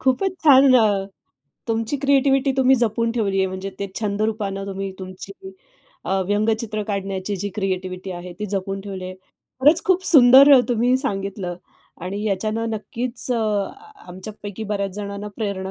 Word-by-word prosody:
खूपच 265 +9 +1
छान 270 -3 +7
अ, 205 -5 +3 0.6
तुमची 225 +4 -1
क्रिएटिव्हिटी 275 0 +2
तुम्ही 265 0 +5
जपून 230 -1 0
ठेवली 200 -5 0
आहे 190 - +2
म्हणजे 190 +1 -5
ते 200 - -3
छंद 210 -1 -1
रूपानं 200 -3 -2
तुम्ही 195 0 -4
तुमची 185 +1 -9 0.7
अ, 190 +1 0
व्यंगचित्र 215 +1 0
काढण्याची 195 0 -3
जी 205 +2 -3
क्रिएटिव्हिटी 185 -2 -3
आहे, 180 0 -7
ती 210 +4 -6
जपून 195 0 -3
ठेवली 195 -2 -7
आहे. 185 0 -6 0.5
खरंच 300 +6 +5
खूप 375 0 +2
सुंदर 275 -1 +8
अ, - - +6
तुम्ही 245 +2 +2
सांगितलं 195 -8 -4 0.5
आणि 200 +3 -4
याच्यानं 215 +3 -1
नक्कीच 240 +3 -5
अ, 240 - 0 0.7
आमच्यापैकी 205 +3 -8
बऱ्याच 200 -2 -2
जणांना 200 0 -6
प्रेरणा 200 -3 -3
210 Hz, 150 wpm, -22 LUFS, 195-245 Hz, 0.7 s, सुंदर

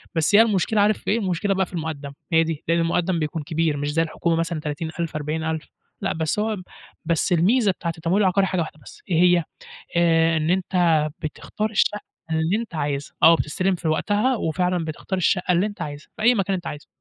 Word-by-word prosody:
بس 160 +5 +3
هي 220 - +9
المشكلة 210 -1 +2
عارف 210 0 +3
في - - -2
إيه، 230 - +2
المشكلة 195 0 0
بقى 190 0 +1
في 180 - -18
الُمقدم، 155 -4 -4 0.2
هي 165 0 +5
دي 160 -2 -4
لإن 170 0 +2
المُقدَّم 170 +1 +1
بيكون 155 0 -3
كبير 160 -1 0
مش 145 +1 -2
زي 165 - +2
الحكومة 165 +1 -1
مثلًا 165 -1 -1
30.000 160 +2 -4
40.0000 160 +1 -2 0.4
لأ، - - 0
بس 160 +5 -1
هوب 215 -2 -1 0.5
بس 170 +3 0
الميزة 205 +5 +3
بتاعة 170 -2 -4
التمويل 170 +5 +1
العقاري 190 +1 +3
حاجة 185 -2 0
واحدة 155 -1 -6
بس - - -14
إيه 170 -1 +3
هي؟ 175 -2 +4 0.5
آآ 165 -1 +4
إن 155 +1 0
أنت 175 -4 +2
بتختار 210 +7 -4
الشّقّة 210 0 +1 0.3
اللي 160 +5 +1
أنت 225 -6 -6
عايزها 145 -2 -3
آه، 165 - +9
بتستلم 185 +5 0
في 165 -2 -5
وقتها، 205 +10 +1
وفعلًا 180 0 0
بتختار 165 +4 -4
الشقة 180 +1 +1
اللي 180 +3 +3
أنت 205 -1 -6
عايزها 145 0 -6
في - - -7
أي 245 +2 +5
مكان 195 -2 0
أنت 175 - -5
عايزه، 150 - -7
170 Hz, 205 wpm, -23 LUFS, 160-190 Hz, 0.5 s, هي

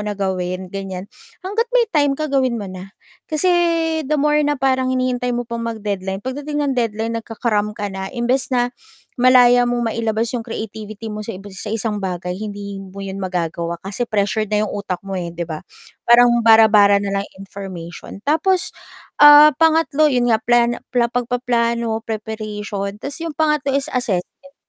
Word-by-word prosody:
na 210 - -2
gawin." 185 -1 -3
Ganiyan. 195 -1 -6 0.4
Hangga't 445 +5 -1
may 485 -2 +3
time 290 -3 +3
ka 310 +1 -3
gawin 260 -3 +1
mo 200 - -6
na. 185 +1 -9 0.4
Kasi 310 +4 +1 0.6
the 305 +3 0
more 300 +1 +3
na 295 0 +1
parang 260 -1 +1
hinihintay 250 -1 0
mo 245 0 -2
pang 235 0 -4
mag-deadline 200 -4 -3
pagdating 290 +3 -3
ng 280 - 0
deadline 225 -1 -1
nagka-cram 220 -2 -1
ka 205 -1 -3
na. 190 0 -5
Imbes 250 +1 0
na 245 -1 +2 0.5
malaya 245 -1 +6
mong 240 -2 -1
mailabas 225 0 -1
'yong 245 - -2
creativity 220 -1 -6
mo 210 - -5
sa 215 -1 -6
iba 195 +1 -11
sa 190 +3 -7
isang 215 -1 -2
bagay 180 -2 -3
hindi 200 0 -6
mo 195 +1 -9
yun 195 0 -6
magagawa 170 -2 -3
kasi 210 +5 -3
pressured 215 +1 0
na 210 +1 +1
'yong - - -5
utak 200 -3 -3
mo, 195 - -6
eh, 175 -1 -4
'di 170 0 -4
ba? 160 -2 -6 0.5
Parang 240 0 +6
bara-bara 220 -3 +6
na 200 0 -3
lang 200 - -7
information. 190 -3 -9
Tapos, 345 +5 +1 0.5
ah, 295 +1 +9
pangatlo, 320 -2 +4
'yon 245 -3 +1
nga 220 - +2
plano 240 +1 +2 0.2
na 235 -1 +3
pagpaplano, 235 -2 0
preparation. 210 -2 -5
'Tas 280 +8 -7
'yong 330 -3 -5
pangatlo 300 -3 +1
is 280 - -2
assessment. 250 +4 -3
225 Hz, 170 wpm, -19 LUFS, 200-255 Hz, 0.6 s, ah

